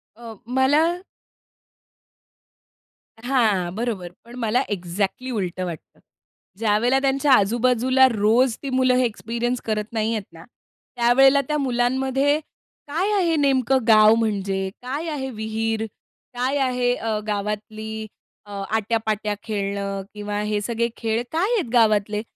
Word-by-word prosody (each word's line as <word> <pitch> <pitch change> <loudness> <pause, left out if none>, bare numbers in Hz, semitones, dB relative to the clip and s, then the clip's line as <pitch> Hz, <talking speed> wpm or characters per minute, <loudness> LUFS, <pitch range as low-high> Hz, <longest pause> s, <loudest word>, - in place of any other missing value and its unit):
अ, 230 -1 -10
मला 265 +5 +3 2.4
हां, 220 -9 +1
बरोबर. 215 -6 -3 0.2
पण 235 +1 -12
मला 235 +2 +1
एक्झॅक्टली 200 +6 -3
उलटं 185 -5 -3
वाटतं. 170 -4 -9 0.6
ज्यावेळेला 230 +5 +2
त्यांच्या 275 +1 +1
आजू-बाजूला 250 +4 +4
रोज 225 +3 +2
ती 275 - -3
मुलं 255 -1 +2
हे 255 0 +3
एक्सपिरियन्स 235 +2 -3
करत 215 -1 -1
नाहीयेत 220 -1 -1
ना, 165 0 -12 0.5
त्यावेळेला 265 +4 +5
त्या 300 - 0
मुलांमध्ये 265 +2 +1 0.5
काय 355 +8 -1
आहे 340 -4 +2
नेमकं 270 -3 +2
गाव 215 0 +7
म्हणजे? 195 -4 -1
काय 280 +6 -4
आहे 275 -4 -3
विहीर? 220 0 -2 0.5
काय 260 +3 0
आहे 250 -2 +1
अ, 220 -3 -2
गावातली 215 +1 -4 0.4
अ, 205 - -13 0.2
आट्या-पाट्या 220 -1 -1
खेळणं 200 -2 -3
किंवा 205 0 -4
हे 210 0 -1
सगळे 235 +1 -1
खेळ 225 0 -1
काय 370 +9 +1
आहेत 350 - -2
गावातले? 210 -3 +3
230 Hz, 120 wpm, -22 LUFS, 210-260 Hz, 2.4 s, गाव